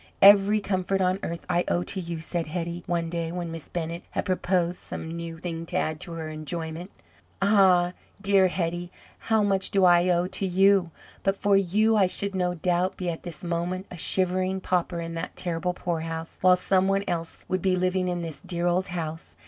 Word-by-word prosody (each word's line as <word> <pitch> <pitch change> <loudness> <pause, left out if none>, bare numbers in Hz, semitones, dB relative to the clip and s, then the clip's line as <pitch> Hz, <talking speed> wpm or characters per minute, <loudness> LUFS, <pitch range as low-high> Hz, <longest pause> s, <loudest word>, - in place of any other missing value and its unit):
"Every 200 +1 +7
comfort 195 -1 -1
on 185 0 +1
earth 170 0 -5
I 175 -1 +2
owe 175 - +1
to 190 - -3
you," 170 -2 -5
said 165 0 -3
Hetty, 170 +1 -4
one 170 -1 0
day, 165 -1 -3
when 175 -1 -4
Miss 165 -2 -7
Bennett 170 0 -4
had - - -3
proposed 180 -1 0
some 160 +1 -7
new 170 -1 -6
thing 165 -1 -5
to - - -5
add 155 0 -1
to 175 - -6
her 160 -1 -5
enjoyment. 160 +3 -5 0.5
"Ah, 190 -3 +4 0.3
dear 195 -1 +4
Hetty! 175 -1 -2 0.3
how 220 -1 +2
much 195 -1 +1
do 195 -2 +3
I 175 0 +5
owe 175 0 +2
to 190 +2 -3
you! 190 0 +4 0.3
But 195 0 0
for 200 0 +3
you, 210 +4 +3
I 195 -3 +5
should, 200 +2 0
no 180 -1 0
doubt, 180 +2 0
be 180 -2 -2
at 165 - -7
this 175 -2 -8
moment 175 +2 -2
a 180 - -7
shivering 185 +1 +1
pauper 180 -1 0
in 165 0 -5
that 165 - -5
terrible 180 0 -1
poorhouse, 165 -2 -4
while 185 0 +6
some 185 +1 +2
one 195 0 +1
else 165 -1 -4
would 185 -1 -1
be 185 0 +2
living 185 0 0
in 175 -1 -2
this 160 -3 -7
dear 175 -1 -2
old 180 +2 +1
house. 165 -3 -5
180 Hz, 200 wpm, -26 LUFS, 170-190 Hz, 0.5 s, Every